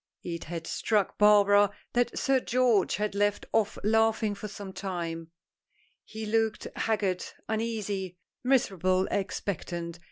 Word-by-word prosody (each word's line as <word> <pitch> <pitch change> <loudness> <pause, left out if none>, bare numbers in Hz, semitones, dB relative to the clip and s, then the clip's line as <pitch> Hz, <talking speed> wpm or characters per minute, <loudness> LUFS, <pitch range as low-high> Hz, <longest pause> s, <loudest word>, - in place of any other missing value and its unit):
It 170 -1 -5
had 165 0 -5
struck 210 +3 0
Barbara 205 -1 +6 0.2
that 240 0 +1
Sir 270 -2 +2
George 245 -5 +2
had 210 0 -2
left 205 0 0
off 220 -2 +1
laughing 220 0 +2
for 205 +1 -6
some 200 -2 -8
time. 170 -4 -4 0.7
He 220 0 -7
looked 220 0 0
haggard 200 -5 0 0.2
uneasy 210 -5 -2 0.3
miserably 190 -8 +2
expectant. 175 -3 -3
205 Hz, 120 wpm, -28 LUFS, 185-220 Hz, 0.7 s, Barbara